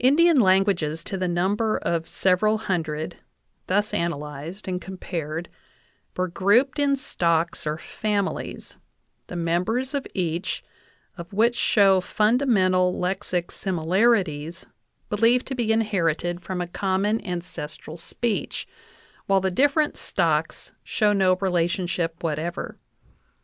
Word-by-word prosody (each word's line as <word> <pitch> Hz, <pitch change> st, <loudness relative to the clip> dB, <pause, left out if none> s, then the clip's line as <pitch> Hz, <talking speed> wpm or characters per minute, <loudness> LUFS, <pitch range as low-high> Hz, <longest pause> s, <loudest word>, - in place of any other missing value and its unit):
Indian 310 Hz, +4 st, +5 dB
languages 185 Hz, -6 st, +2 dB
to 195 Hz, -, -5 dB
the 185 Hz, -1 st, -1 dB
number 195 Hz, +5 st, +1 dB
of 165 Hz, -1 st, -1 dB
several 205 Hz, +4 st, +2 dB
hundred 160 Hz, -7 st, -3 dB, 0.5 s
thus 205 Hz, +3 st, +1 dB
analyzed 155 Hz, +3 st, -4 dB
and 180 Hz, -1 st, -2 dB
compared 170 Hz, -3 st, -5 dB, 0.7 s
were 185 Hz, 0 st, +1 dB
grouped 230 Hz, -, +2 dB
in 280 Hz, -1 st, +3 dB
stocks 170 Hz, -, 0 dB
or 150 Hz, 0 st, -1 dB
families, 205 Hz, +3 st, -3 dB, 0.5 s
the -, -, -7 dB
members 180 Hz, -, 0 dB
of 280 Hz, -2 st, -2 dB
each 175 Hz, -1 st, -2 dB, 0.6 s
of 170 Hz, 0 st, -8 dB
which 230 Hz, +4 st, +3 dB
show 195 Hz, -5 st, +4 dB
fundamental 195 Hz, -5 st, +2 dB
lexic 180 Hz, -1 st, -2 dB
similarities 175 Hz, -3 st, +1 dB, 0.4 s
believed 230 Hz, +4 st, +3 dB
to 270 Hz, -, -4 dB
be 235 Hz, -4 st, 0 dB
inherited 175 Hz, -6 st, 0 dB
from 185 Hz, 0 st, -4 dB
a 175 Hz, -, -3 dB
common 195 Hz, +4 st, 0 dB
ancestral 170 Hz, -4 st, -6 dB
speech, 210 Hz, +6 st, -3 dB, 0.6 s
while 195 Hz, 0 st, +4 dB
the 190 Hz, 0 st, 0 dB
different 290 Hz, -, +2 dB
stocks -, -, -1 dB
show 210 Hz, -2 st, +2 dB
no 190 Hz, -2 st, +4 dB
relationship 175 Hz, -2 st, -1 dB
whatever. 165 Hz, +2 st, -3 dB
185 Hz, 115 wpm, -24 LUFS, 170-215 Hz, 0.7 s, Indian